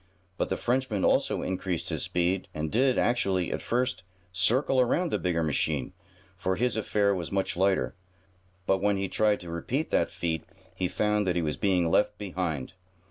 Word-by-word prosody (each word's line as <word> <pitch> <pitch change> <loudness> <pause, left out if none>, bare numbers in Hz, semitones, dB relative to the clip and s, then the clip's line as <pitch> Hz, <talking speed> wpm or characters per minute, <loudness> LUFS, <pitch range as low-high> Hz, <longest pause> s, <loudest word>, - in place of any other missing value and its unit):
But - - -1
the - - -1
Frenchman 120 -5 0
also - - +2
increased 95 -2 -2
his - - -2
speed 90 +2 0
and 75 0 -3
did, 130 +2 +3
actually, 95 -7 +1
at - - -3
first, 125 -5 0 0.3
circle 120 +9 +3
around 165 +7 +1
the - - 0
bigger 85 -2 0
machine, 75 -1 -1 0.4
for 95 +1 -1
his 125 +4 0
affair 105 -2 +1
was 90 -4 -4
much 95 -1 -1
lighter. 95 +2 +1 0.7
But 95 0 +2
when 100 0 +2
he 95 0 -1
tried 105 +1 +2
to 85 -1 -7
repeat 125 - -2
that - - +2
feat 80 -2 -2 0.3
he 90 - -1
found 105 +1 0
that 90 - +1
he 85 - +1
was 75 -2 -1
being 90 -1 +1
left 105 +4 +2
behind. 90 -8 -3
95 Hz, 180 wpm, -28 LUFS, 85-105 Hz, 0.7 s, did